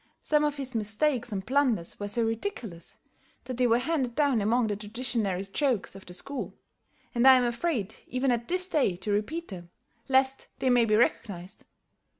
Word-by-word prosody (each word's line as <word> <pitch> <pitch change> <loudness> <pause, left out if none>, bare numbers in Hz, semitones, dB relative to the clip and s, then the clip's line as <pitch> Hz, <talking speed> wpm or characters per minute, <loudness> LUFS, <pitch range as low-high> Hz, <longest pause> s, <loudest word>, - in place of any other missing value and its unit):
Some 300 -1 +2
of 295 -1 +1
his 265 -2 -1
mistakes 230 +4 +1
and 190 -2 -4
blunders 255 -10 +1
were 205 - -3
so 230 +3 +1
ridiculous, 225 - -4 0.5
that 255 -2 -6
they 250 -1 +3
were 230 0 +4
handed 255 -3 -1
down 280 -7 +2
among 230 +4 +2
the 210 -1 -1
traditionary 210 -2 -1
jokes 235 +3 -1
of 195 0 -12
the 180 - -6
school, 275 +8 -4 0.6
and 240 +1 +3
I 265 - +10
am 255 - +3
afraid 240 - -2
even 255 +1 0
at 235 -1 -1
this 365 +1 0
day 285 - +1
to 190 +4 -4
repeat 295 +12 -2
them, 175 -3 -8 0.4
lest 265 0 +2
they 260 - +1
may 245 -1 +4
be 215 -1 +2
recognized. 200 -4 -1
240 Hz, 180 wpm, -28 LUFS, 205-270 Hz, 0.6 s, I